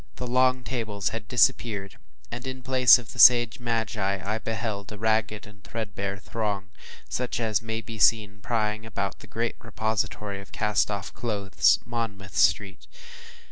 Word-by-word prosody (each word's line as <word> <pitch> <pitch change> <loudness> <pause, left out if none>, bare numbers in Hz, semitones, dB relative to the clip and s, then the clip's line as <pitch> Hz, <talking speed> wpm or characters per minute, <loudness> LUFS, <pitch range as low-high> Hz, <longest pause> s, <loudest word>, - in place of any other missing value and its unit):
The 125 - -5
long 130 +1 +2
tables 110 -6 -2
had 115 -1 -6
disappeared, 115 -5 +1 0.3
and, 120 +2 -6
in 130 -1 -6
place 130 -1 +7
of 120 -3 -10
the 120 - -10
sage 120 0 +7
magi, 110 -4 -1
I 110 +2 -1
beheld 110 -3 -4
a 105 - -7
ragged, 110 -1 -2
threadbare 100 -3 -4
throng, 100 -2 -4 0.4
such 125 -1 -3
as 110 -3 0
may 110 0 -4
be 110 -1 -9
seen 105 -2 +3
plying 110 -1 -1
about 100 -3 -4
the - - -13
great 115 +1 -3
repository 105 -3 -3
of 100 - -15
cast 105 -1 +1
off 100 -2 -4
clothes, 105 -5 +2
Monmouth 110 -5 -5
Street. 95 - +1
110 Hz, 150 wpm, -26 LUFS, 100-115 Hz, 0.4 s, place